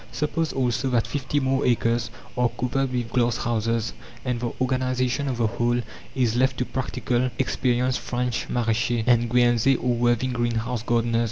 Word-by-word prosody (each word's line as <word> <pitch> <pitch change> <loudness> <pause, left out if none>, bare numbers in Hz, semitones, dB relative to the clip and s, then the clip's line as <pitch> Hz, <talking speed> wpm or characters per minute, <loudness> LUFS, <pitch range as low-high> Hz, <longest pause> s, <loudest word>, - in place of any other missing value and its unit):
Suppose 155 +2 -1
also 125 -1 0
that 120 -3 +2
fifty 145 0 -1
more 135 0 +1
acres 115 -1 +1 0.3
are 125 -1 +2
covered 130 +2 -1
with 120 -2 -2
glass 120 -1 +2
houses, 115 -1 -1 0.3
and 125 -2 -1
the 120 -1 -2
organization 130 +1 0
of 130 -3 -2
the 120 - +2
whole 120 +2 +1 0.4
is 120 -4 +1
left 130 +1 +2
to 125 - 0
practical 125 -1 -1
experienced 125 -1 +1
French 125 -1 -2
maraîchers, 115 0 0
and 120 -1 +3
Guernsey 120 +1 +4
or 125 0 0
Worthing 120 +1 +1
greenhouse 120 0 -1
gardeners. 115 0 +1
120 Hz, 160 wpm, -24 LUFS, 120-130 Hz, 0.4 s, Guernsey